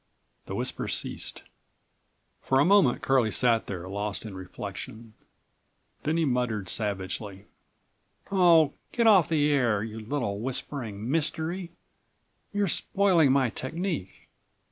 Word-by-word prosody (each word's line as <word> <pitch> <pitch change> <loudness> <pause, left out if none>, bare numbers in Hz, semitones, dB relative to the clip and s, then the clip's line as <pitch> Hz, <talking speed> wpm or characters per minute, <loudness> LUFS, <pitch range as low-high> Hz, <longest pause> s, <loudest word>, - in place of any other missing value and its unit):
The - - -4
whisper - - -3
ceased. - - -2 1.0
For 130 - +1
a 140 - +5
moment 190 -9 +4
Curlie 130 -4 +3
sat 115 0 +2
there 90 -2 -5
lost 100 +2 -4
in 105 - -7
reflection, 110 +4 -8 0.9
then 155 +2 0
he 165 - +2
muttered 120 -7 -1
savagely: 100 -1 -3 0.9
"Oh! 170 -6 +5 0.2
get 235 - +1
off 200 -7 +6
the 150 -2 +2
air, 120 -7 +2
you 110 0 -6
little 110 -3 -3
whispering 120 -2 -4
mystery, 165 +3 -2 0.8
you're 205 -1 0
spoiling 180 -5 +3
my 130 -3 +2
technique. 160 - -5
130 Hz, 120 wpm, -27 LUFS, 105-160 Hz, 1.0 s, off